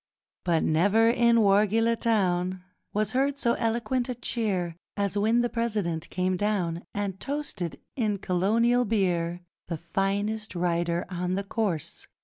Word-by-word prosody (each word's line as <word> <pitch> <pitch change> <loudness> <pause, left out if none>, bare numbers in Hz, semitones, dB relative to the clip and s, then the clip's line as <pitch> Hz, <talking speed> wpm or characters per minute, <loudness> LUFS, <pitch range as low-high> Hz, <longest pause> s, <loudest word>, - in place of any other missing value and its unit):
But 170 -2 +2
never, 200 +8 +4
in 235 -1 +4
Wargeilah 215 +3 +3
Town, 185 -4 +1 0.3
Was 215 0 0
heard 275 +3 +1
so 235 -4 +2
eloquent 235 +2 0
a 250 - -2
cheer 195 -8 -1 0.2
As 200 0 0
when 220 +4 +3
the 240 - +1
President 210 -9 -2
came 185 +1 0
down, 180 -5 0
And 200 -2 -3
toasted, 210 - -4 0.2
in 215 -5 0
Colonial 220 +7 +2
Beer, 180 -6 0 0.3
'The 165 - -3
finest 200 +5 -2
rider 170 0 0
on 180 0 -2
the 200 - -1
course! 195 -6 -3
200 Hz, 135 wpm, -27 LUFS, 180-230 Hz, 0.3 s, never